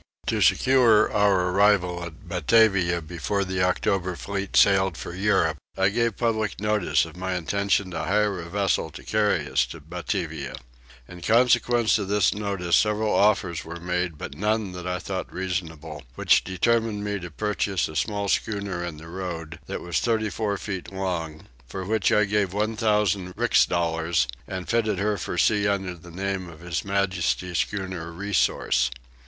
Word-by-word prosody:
To - - 0
secure 120 -5 +4
our 100 -3 +3
arrival 90 -3 +3
at 85 +2 -10
Batavia 90 -1 +3
before 90 +5 -2
the 95 0 -2
October 90 0 0
fleet 100 +2 -3
sailed 95 -3 +4
for 85 - -7
Europe 90 -5 +1 0.2
I 95 0 +3
gave 115 0 0
public 110 -3 -1
notice 105 -2 +1
of - - -12
my 95 0 -3
intention 100 +2 0
to - - -3
hire 105 0 +1
a 85 - -9
vessel 100 +1 0
to - - -11
carry 105 -8 +1
us 65 -3 +2
to 80 - -9
Batavia. 80 -3 -4 0.5
In 90 0 -11
consequence 120 +1 +3
of 100 - -3
this 100 -2 +2
notice 100 -4 0
several 105 0 +1
offers 100 -5 +2
were 85 +1 -8
made 90 -2 -2
but - - -7
none 105 0 0
that 90 0 -7
I 90 0 -1
thought 95 0 -5
reasonable; 80 -5 -4
which - - +4
determined 110 +3 0
me 105 -1 -2
to 85 -1 -7
purchase 100 +1 -1
a 80 - -10
small 100 +3 -1
schooner 100 -4 -1
in 85 -3 -5
the 80 +2 -11
road, 85 -3 -6
that - - -4
was 85 -2 -1
34 110 -2 -1
feet 95 -3 -6
long, 90 -5 -4 0.2
for 95 +9 -6
which 110 -1 +1
I 105 - +4
gave 100 -2 0
1000 105 -3 0
rix - - +4
dollars 80 -5 0 0.2
and 95 -1 -5
fitted 110 -3 +1
her 105 +2 0
for - - -4
sea 105 -2 +3
under 95 -2 -1
the 85 0 -14
name 95 +1 -3
of 80 -1 -13
His 85 0 -3
Majesty's 90 -3 0
schooner 95 -5 -3
Resource. 90 -8 +1
95 Hz, 165 wpm, -25 LUFS, 85-105 Hz, 0.5 s, secure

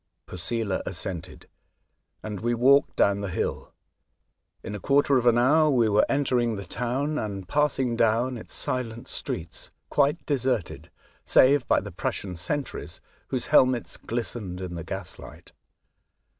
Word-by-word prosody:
Posela 95 +3 -2
assented, 85 -1 -4 0.8
and 105 -2 -5
we 120 +3 0
walked 135 +5 +4
down 100 0 +3
the 100 - -3
hill. - - -3 0.9
In - - -6
a 105 - -5
quarter 140 +2 +3
of 120 - -1
an 120 0 +5
hour 155 +6 +4
we 120 -6 +3
were 105 +1 +3
entering 125 -5 +1
the 100 -1 -6
town 130 - -2
and 100 -3 -5
passing 135 -2 +1
down 115 +3 +2
its 115 - -6
silent 120 -2 -2
streets, 80 - -3 0.2
quite 145 +3 +2
deserted, 130 - -1 0.3
save 135 0 +4
by - - +4
the 100 - -8
Prussian 90 +1 -4
sentries, 135 - -3 0.3
whose 130 -3 -2
helmets 130 -4 +4
glistened 110 -5 -4
in 90 -2 -5
the 85 -1 -5
gaslight. 95 +2 -8
120 Hz, 140 wpm, -26 LUFS, 100-130 Hz, 0.9 s, an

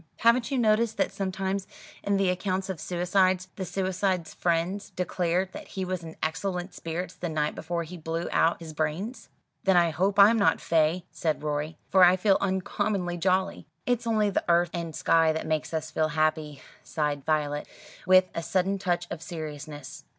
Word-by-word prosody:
Haven't 235 +1 +3
you 275 - -1
noticed 225 -1 +2
that - - +1
sometimes 190 0 -2 0.4
in 200 0 +1
the 195 -2 +2
accounts 190 +1 -2
of 180 - -7
suicides, 185 +2 +1
the 190 - -4
suicide's 185 -1 -1
friends 175 +4 -1
declare 180 0 0
that - - -9
he 190 -1 -4
was 185 -1 -3
in 160 -1 -9
excellent 180 +3 -2
spirits 165 +3 -5
the 175 - -5
night 150 -1 0
before 170 +1 -3
he 175 +3 -9
blew 165 +1 -3
out 165 +1 +2
his 160 -2 -8
brains?" 180 +10 -3 0.3
"Then 190 -2 +4
I 170 -1 +4
hope 190 +5 0
I'm 210 +3 +7
not 200 - +3
'fey,'" 165 +2 +1
said 155 -2 -2
Rorie, 150 +1 -2
"for 190 -1 +6
I 180 +1 +7
feel 195 +1 +3
uncommonly 190 -1 -1
jolly." 185 +1 0 0.2
"It's 245 -1 0
only 215 -2 +2
the - - 0
earth 170 0 +3
and 170 -2 -4
sky 165 -1 +3
that 160 - -3
make 155 -1 -1
us 160 -1 -3
feel 155 0 +1
happy," 155 -1 -1 0.2
sighed 150 -3 -2
Violet, 150 -1 0 0.4
with 185 0 +7
a 170 - -2
sudden 190 +3 0
touch 175 -2 0
of 160 - -5
seriousness. 150 -3 -7
175 Hz, 180 wpm, -27 LUFS, 160-190 Hz, 0.4 s, I'm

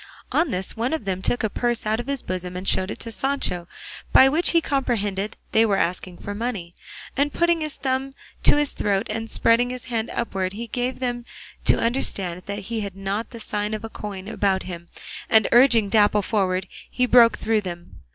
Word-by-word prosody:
On 325 0 +2
this 185 -4 -2
one 235 +5 -1
of 315 -10 -3
them 190 -1 -2
took 245 +5 0
a - - +3
purse 240 +2 -1
out 215 +1 0
of 240 - -5
his 280 -2 -3
bosom 180 -1 -4
and 185 - -6
showed 185 +1 +2
it - - -5
to 230 - -6
Sancho, 225 -9 -2 0.4
by 265 - +8
which 320 +5 +4
he 335 - +4
comprehended 215 -9 -1
they 220 - +5
were 205 -3 +2
asking 180 0 -2
for 205 - -6
money, 205 -6 -4 0.4
and 285 +2 +1
putting 340 0 +2
his 305 -2 -3
thumb 265 0 -2 0.3
to - - +6
his 295 -1 +1
throat 195 -1 0
and 225 +1 -4
spreading 235 +3 +3
his 250 -1 -6
hand 230 -2 -2
upwards 195 -5 -2
he 230 +2 -4
gave 245 +2 -2
them 245 -2 -2 0.4
to - - +5
understand 195 -7 0
that 200 0 -3 0.2
he 225 - 0
had 200 -3 -5
not 195 +3 -3
the 230 - -9
sign 210 0 -2
of 215 - -7
a 225 - -5
coin 200 -3 -7
about 200 -3 0
him, 170 -2 -8 0.4
and 220 -1 +5
urging 240 -4 +6
Dapple 210 -1 +3
forward 190 -3 0 0.2
he 250 - +1
broke 240 -2 +6
through 220 -1 +1
them. 175 -3 -8
220 Hz, 205 wpm, -23 LUFS, 195-250 Hz, 0.4 s, by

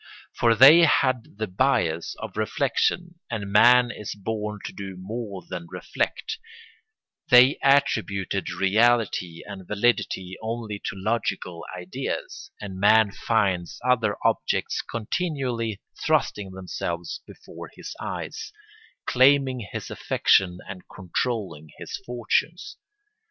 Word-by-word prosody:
For 115 -1 +3
they 135 +8 +9
had 130 -9 +2
the 110 - -1
bias 90 -6 0
of - - -8
reflection 175 -1 -1
and 105 -4 -4
man 120 +3 +6
is 105 -4 -7
born 105 +1 -4
to - - -6
do 95 -2 -7
more 100 0 -6
than 85 -1 -6
reflect; - - -3 0.9
they 125 +3 +7
attributed 105 -8 +1
reality 105 -4 +1
and 95 -3 -9
validity 100 -4 0
only 110 -2 -4
to - - -3
logical 95 -4 -2
ideas, 90 +1 -5
and 95 -3 -7
man 105 +1 +5
finds 95 -5 -1
other 115 -5 +2
objects - - 0
continually 120 - -3 0.2
thrusting 100 -2 0
themselves 85 -2 -5
before - - -11
his - - -9
eyes, - - -5 0.5
claiming 130 -3 +3
his - - -6
affection 90 -2 +2
and 95 -2 -8
controlling 95 -4 -3
his - - -6
fortunes. 145 - -1
105 Hz, 110 wpm, -25 LUFS, 95-125 Hz, 0.9 s, they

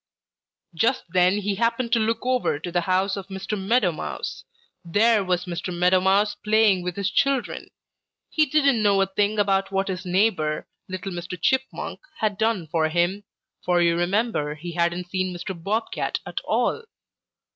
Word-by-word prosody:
"Just 230 +10 +1
then 180 +2 +3
he 205 0 -1
happened 230 +3 0
to 235 - +4
look 225 +2 -1
over 255 - +1
to 165 +4 -6
the 175 0 +1
house 190 +2 +1
of 195 -2 -7
Mr. 195 +2 -4
Meadow 200 0 +2
Mouse. 75 - -6 0.4
There 210 +5 +3
was 180 -1 0
Mr. 180 +1 -4
Meadow 180 +1 +3
Mouse 200 +2 +3
playing 210 -2 +3
with 180 0 -4
his 200 0 -1
children. 275 -2 0 0.6
He 310 -1 +3
didn't 275 -5 +3
know 200 -2 +3
a - - +1
thing 205 +2 0
about 195 -1 +1
what 195 0 0
his 185 -1 -3
neighbor, 180 -5 +1 0.2
little 185 +1 -5
Mr. 175 0 -6
Chipmunk, 265 +9 -1 0.2
had 210 -3 -1
done 220 -6 +1
for 160 0 0
him, 175 +5 0 0.4
for 175 -1 +2
you 170 -1 +3
remember 175 -4 0
he 170 +3 -7
hadn't 175 +1 -1
seen 185 -1 -1
Mr. 180 +2 -5
Bob 205 +6 -2
Cat - - -2
at - - -4
all. 460 - 0
195 Hz, 170 wpm, -24 LUFS, 175-215 Hz, 0.6 s, to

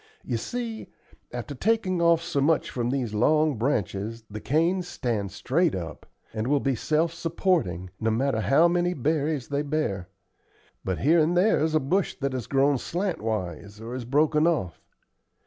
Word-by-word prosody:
You 120 - -2
see, 230 - -5 0.4
after 120 +4 -5
taking 185 - 0
off 170 -1 +4
so 170 -5 -1
much 155 +3 +2
from 120 -1 -1
these 125 -5 -2
long 150 +3 +2
branches 115 -3 -1
the 105 - -5
canes 170 +6 +1
stand 105 - -2
straight 165 - +1
up, 85 -3 -7 0.3
and 110 +1 -2
will 145 +1 +3
be 135 0 0
self 155 +6 0
supporting, 165 - -1
no 110 - +1
matter 115 +1 +1
how 150 +9 +5
many 175 +1 +1
berries 150 0 -1
they 145 0 0
bear; 140 -12 -2 0.7
but 95 -2 -2
here 165 +5 +4
and 165 +3 +2
there's 160 -5 +3
a - - +5
bush 180 +8 0
that 140 -1 -2
has 125 -5 -4
grown 140 0 +2
slant 180 +2 -2
wise, 100 -2 -4
or 115 +2 -7
is 125 -2 -5
broken 150 +4 +3
off. 95 - -1
140 Hz, 165 wpm, -26 LUFS, 115-165 Hz, 0.7 s, how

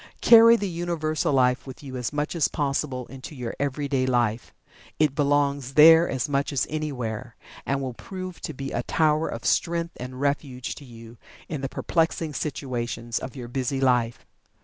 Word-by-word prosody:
Carry 230 0 +8
the 205 -3 -2
Universal 165 -4 -1
Life 125 0 +2
with 130 +2 -10
you 130 -2 -7
as 125 -2 -3
much 150 +3 -2
as 160 -5 +3
possible 140 -3 -2
into 135 +4 -10
your 125 -3 -5
everyday 140 -1 -1
life. 120 -3 0 0.5
It 150 -3 +2
belongs 140 -2 +1
there 165 +2 +8
as 130 +1 -1
much 140 0 0
as 140 - 0
anywhere, 125 -6 -4 0.3
and 140 0 0
will 130 -2 -4
prove 185 +6 -8
to 155 - -5
be 135 +1 -5
a 120 - -1
tower 155 +4 +1
of 115 - -6
strength 170 0 0
and 125 +1 -7
refuge 140 -3 -2
to 145 - -12
you 115 -1 -13 0.3
in 150 -5 -4
the 135 - -3
perplexing 165 -1 -1
situations 120 -5 -3
of 130 - -7
your 125 -3 -7
busy 130 +2 -2
life. 125 -3 +1
140 Hz, 170 wpm, -25 LUFS, 125-155 Hz, 0.5 s, Carry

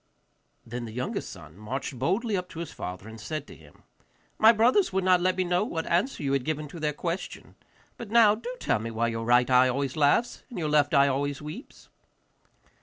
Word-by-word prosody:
Then 120 +1 -6
the 110 - -8
youngest 125 +2 -4
son 75 +1 -12
marched 125 +4 -5
boldly 200 - 0
up 180 -1 -3
to 165 - -9
his 170 - -5
father 90 +3 -7
and 110 0 -10
said 155 +2 -5
to - - -13
him, 75 -2 -19 0.6
'My 220 +1 +8
brothers 240 - +3
would 190 0 0
not 180 -1 +4
let 185 +1 +1
me 185 - +2
know 180 +2 +1
what 165 -7 -3
answer 180 - 0
you 140 -1 0
had 135 -2 +1
given 155 0 -3
to 170 - -9
their 150 -1 0
question. 170 +4 -5 0.4
But 235 - -8
now, 225 -2 +6
do 230 +3 -6
tell - - 0
me 115 +2 -5
why 115 +1 -1
your 115 0 -4
right 120 +1 +4
eye 130 0 +5
always 135 +1 -2
laughs 155 +11 +2
and 245 - -9
your 155 -3 -1
left 150 0 +3
eye 140 0 +6
always 140 +1 -1
weeps. 155 - -10
150 Hz, 215 wpm, -27 LUFS, 125-185 Hz, 0.6 s, My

